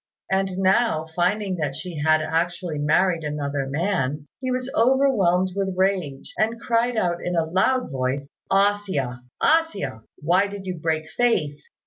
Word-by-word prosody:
And 190 -1 0
now, 190 -3 +2
finding 190 +2 0
that 145 -4 -2
she 160 +1 -6
had 155 0 +4
actually 170 0 -1
married 165 +3 +2
another 145 -2 -2
man, 150 -2 -1
he 260 -1 -3
was 255 0 -1
overwhelmed 225 -8 +3
with 195 -2 -1
rage, 185 -8 -1
and 225 +2 +1
cried 235 +1 +1
out 175 -4 0
in 180 - -2
a 165 -1 +2
loud 190 +8 +1
voice, 135 +1 -2 0.2
"A 200 +1 +4
hsia! 140 -12 -3 0.2
A - - +5 0.2
hsia! 135 - -6 0.2
why 180 +6 +2
did 200 -1 -8
you 180 -3 -4
break 160 0 -1
faith?" 155 -13 0
180 Hz, 155 wpm, -23 LUFS, 150-200 Hz, 0.2 s, A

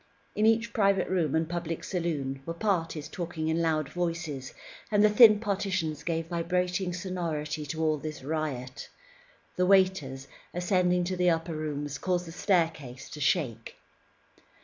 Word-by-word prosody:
In 215 +1 +3
each 230 +1 +2
private 200 -3 +2
room 170 -6 +1
and 160 0 +1
public 170 -1 -4
saloon, 150 -7 -2
were 165 +4 -5
parties 165 -6 -1
talking 165 -3 -4
in 160 +1 +1
loud 155 -3 +1
voices, 165 -6 -3 0.4
and 205 -1 +3
the 210 - +5
thin 215 -1 +8
partitions 190 -7 -1
gave 165 -1 -2
vibrating 180 +2 -1
sonority 165 -5 -3
to 160 +3 -3
all 155 -1 +2
this 155 -2 -6
riot. 140 -4 -4 0.7
The 180 0 +2
waiters, 185 -9 +2 0.3
ascending 180 0 +2
to 185 +1 -2
the 180 0 +3
upper 165 0 0
rooms, 145 -2 -4
caused 180 -1 0
the 165 - -8
staircase 160 -9 -1
to 150 - -7
shake. 135 - 0
165 Hz, 150 wpm, -28 LUFS, 155-180 Hz, 0.7 s, thin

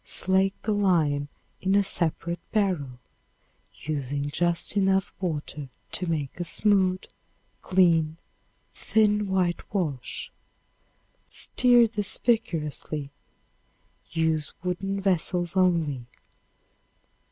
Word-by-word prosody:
Slake 190 +1 +1
the 215 - -1
lime 160 -8 +1 0.3
in 190 +1 +1
a 200 - +4
separate 170 -1 -1
barrel, 180 - 0 0.9
using 140 -2 -2
just 170 +4 +2
enough 195 -1 +2
water 150 -5 -4 0.2
to 180 - -2
make 155 -2 -3
a - - -1
smooth, 185 0 +1 0.6
clean, 165 -4 +3 0.6
thin 210 -1 +2
whitewash. 175 - -2 1.0
Stir 245 -1 +4
this 210 -3 0
vigorously. 155 - -1 1.0
Use 160 -1 -1
wooden 195 +2 -2
vessels 180 -2 +1
only. 165 -9 +1
180 Hz, 85 wpm, -26 LUFS, 155-195 Hz, 1.0 s, a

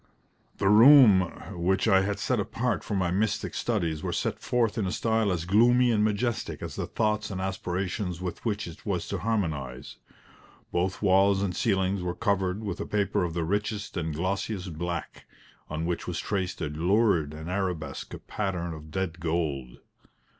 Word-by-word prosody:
The 100 - +1
room 110 -1 +8 0.4
which 95 +4 +2
I 95 -3 +5
had 100 +1 -1
set 120 +4 0
apart 115 +2 -1
for 105 - -3
my 90 -3 +1
mystic 105 +3 0
studies 85 -10 -1
was - - -2
set - - -2
forth 120 -3 0
in 100 - 0
a - - -2
style 110 -2 +1
as 85 -2 -2
gloomy 120 +6 +4
and 105 -2 +2
majestic 110 +2 -1
as - - -5
the - - -3
thoughts 105 -1 0
and 95 -2 -4
aspirations 95 -1 -3
with 90 -1 -5
which 110 -2 -1
it 85 - -10
was - - -2
to - - -2
harmonise. 80 - -3 0.7
Both 95 +3 -1
walls 100 0 +4
and 90 -3 -2
ceilings 95 -2 +1
were 90 0 -3
covered 100 0 0
with 100 -4 -4
a - - -4
paper 100 -3 0
of 85 -2 -3
the 85 - 0
richest 105 +4 -2
and 80 -3 -2
glossiest 95 +2 -3
black, 85 +1 -5 0.4
on 75 +1 -3
which 85 0 -2
was 90 -2 -3
traced 95 -2 -2
a - - 0
lurid 85 0 +2
and 80 +1 -8
arabesque 90 -6 -3
pattern 90 -5 -3
of 75 0 -10
dead 90 0 -3
gold. 80 -7 -2
95 Hz, 175 wpm, -27 LUFS, 85-105 Hz, 0.7 s, room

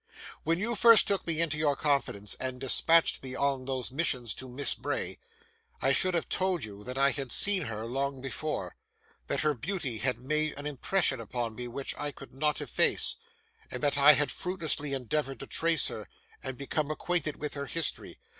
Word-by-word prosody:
When 165 +2 0
you 225 +6 -1
first 230 0 +7
took 200 -3 -1
me 165 -2 +1
into 155 -2 0
your 145 -2 +2
confidence, 135 -9 0
and 130 -1 -2
dispatched 165 +5 +3
me 130 -1 -7
on 135 -2 0
those 130 -2 -3
missions 130 -6 -1
to 130 - -9
Miss 135 +3 +1
Bray, - - -4 0.6
I - - +2
should 185 -1 +2
have 170 - -1
told 185 -2 -1
you 105 -1 -9
that 125 +1 -4
I 140 0 +5
had 135 -3 -5
seen 195 -5 +4
her 110 -2 -5
long 135 +3 -2
before; 135 +4 -4 0.5
that - - 0
her 150 -1 +2
beauty 135 - -4
had 125 +2 0
made 155 +3 0
an 145 - -7
impression 150 0 +1
upon 115 0 -3
me 125 +2 -6
which 135 +3 -3
I 145 - -1
could 135 -1 -13
not 150 +2 0
efface; 145 - +3 0.5
and - - -6
that 145 -1 +2
I 145 +2 +8
had 145 +1 +2
fruitlessly 160 -6 -2
endeavoured 135 0 -2
to - - -6
trace 165 +3 +1
her, 105 -6 -8 0.3
and 130 -1 -5
become 145 +2 -2
acquainted 155 -1 -1
with 150 - -4
her 140 -1 -5
history. 165 +1 -2
140 Hz, 190 wpm, -29 LUFS, 130-155 Hz, 0.6 s, I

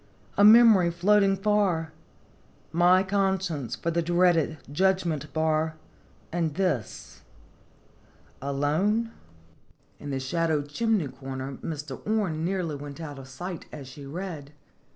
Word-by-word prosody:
A 200 - +4
memory 215 -4 +7
floating 195 +3 +3
far; 195 -6 +1 0.8
My 180 +2 +4
conscience 190 - -1
for 170 +7 -2
the 170 +1 +1
dreaded 170 -2 +2
judgment 170 -3 0
bar; 160 0 0 0.6
And 165 -3 -1
this 175 - -3 1.2
alone?" 155 - 0 0.9
In 145 - -7
the 135 -1 -2
shadowed 150 +1 -1
chimney 215 0 0
corner 135 +1 -6
Mr. 145 -4 -6
Orne 195 -8 0
nearly 180 -3 -1
went 145 +1 -8
out 145 -4 -7
of 135 - -10
sight 175 +6 -7
as 140 -3 -9
she 135 +2 -11
read. 155 -3 -6
165 Hz, 115 wpm, -27 LUFS, 145-190 Hz, 1.2 s, memory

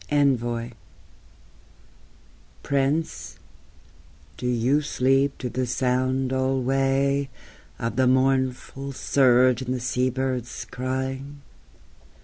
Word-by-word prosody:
ENVOY 120 -5 +1 1.9
Prince, 140 +4 -1 1.0
do 125 - -4
you 125 +4 +2
sleep 135 0 +1
to 125 - -4
the 125 +1 -2
sound 130 +1 0
alway 135 +1 +1 0.5
Of 115 0 -3
the 130 -1 +4
mournful 130 +1 0
surge 130 -2 +3
and 130 0 -2
the - - -3
sea 125 +1 0
birds' 125 -2 -3
crying? 130 +3 -4
130 Hz, 90 wpm, -24 LUFS, 125-135 Hz, 1.9 s, the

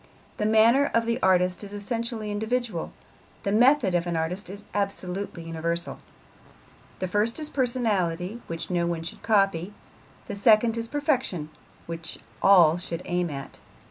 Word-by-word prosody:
The 210 - 0
manner 230 +6 +5
of 230 0 +2
an 235 +1 0
artist 180 0 +2
is 205 0 -8
essentially 220 +1 -3
individual, 220 -3 -2 0.5
the 200 - 0
method 245 -1 +4
of 175 0 +1
an 170 -1 -1
artist 180 +5 -3
is 205 +1 -9
absolutely 195 -3 -3
universal. 165 +1 -3 1.0
The 185 - -2
first 210 - 0
is 305 -1 -4
personality, 220 -6 0
which 165 +2 -5
no 170 -1 +1
one 170 -1 -2
should 170 - -7
copy; 195 -3 +1 0.5
the - - -4
second 220 +3 +4
is 230 0 -3
perfection, 260 - -1 0.3
which 165 0 -6 0.2
all 175 -4 +6
should 170 -1 -5
aim 175 -1 0
at. 140 -2 -7
200 Hz, 145 wpm, -26 LUFS, 170-230 Hz, 1.0 s, all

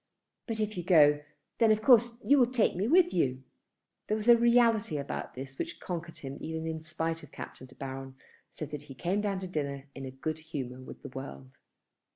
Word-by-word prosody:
But 225 -2 -3
if 215 -2 -1
you 175 - -2
go, 150 -4 +6 0.4
then 225 -2 +6
of 215 0 +2
course 240 -1 +5
you 285 0 +6
will 245 -2 +5
take 245 -4 +2
me 190 +5 0
with 350 +5 +5
you." 130 -6 0 0.6
There 215 - +1
was 215 +1 -4
a 240 - +10
reality 235 -7 +4
about 140 0 -5
this 135 +1 -8
which - - -4
conquered 170 -2 -5
him, 135 0 -7
even 160 0 -4
in 160 -1 -3
spite 165 +1 -3
of 150 - -14
Captain 130 - -9
De 130 - -18
Baron, 135 0 -6 0.3
so 155 - -6
that 150 0 -6
he 135 - -8
came 180 +9 0
down 200 -2 -1
to 185 - -4
dinner 140 -5 -3
in 135 -1 -6
good 155 +3 -3
humour 130 -5 -6
with 130 - -11
the 140 - -7
world. 70 - -9
160 Hz, 205 wpm, -30 LUFS, 135-215 Hz, 0.6 s, a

